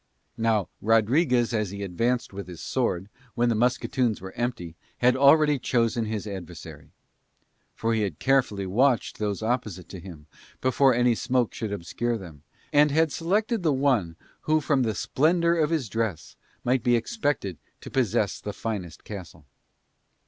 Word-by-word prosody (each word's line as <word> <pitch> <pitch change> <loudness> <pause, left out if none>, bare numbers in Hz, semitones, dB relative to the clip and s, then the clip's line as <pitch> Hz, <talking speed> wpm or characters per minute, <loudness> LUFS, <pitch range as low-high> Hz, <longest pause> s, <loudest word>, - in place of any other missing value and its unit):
Now 110 -3 +2
Rodriguez 120 - +3
as 105 -3 0
he 100 +1 -6
advanced 115 +6 -1
with 100 0 -6
his 90 -3 -9
sword, 95 -8 -1 0.3
when 120 0 +2
the 115 - +2
musketoons 120 0 +1
were 95 0 -8
empty, 115 -9 -3 0.2
had 125 +1 +4
already 145 +1 +5
chosen 115 -2 +1
his 110 -1 -3
adversary. 85 -6 -8 0.9
For 115 0 0
he 110 - +1
had 95 -7 -2
carefully 130 -7 +1
watched 120 +6 +1
those 105 0 -2
opposite 110 -6 -2
to 95 - -8
him, 85 -4 -11 0.3
before 130 0 +3
any 120 0 +3
smoke 125 0 0
should 110 -3 -4
obscure 115 +5 -2
them, 85 -8 -11 0.3
and 150 +1 +6
had 160 +1 +2
selected 210 - 0
the 160 -4 +2
one 130 -12 +1 0.3
who 155 0 +4
from 140 -2 +1
the 110 -4 0
splendour 170 - +2
of 160 -3 +2
his 160 -7 0
dress 105 -6 -3 0.3
might 125 +1 +2
be 120 +1 +3
expected 120 - -2 0.2
to - - -9
possess 110 -5 0
the 105 - -5
finest 95 -7 -5
castle. 90 -7 -9
115 Hz, 155 wpm, -26 LUFS, 100-130 Hz, 0.9 s, and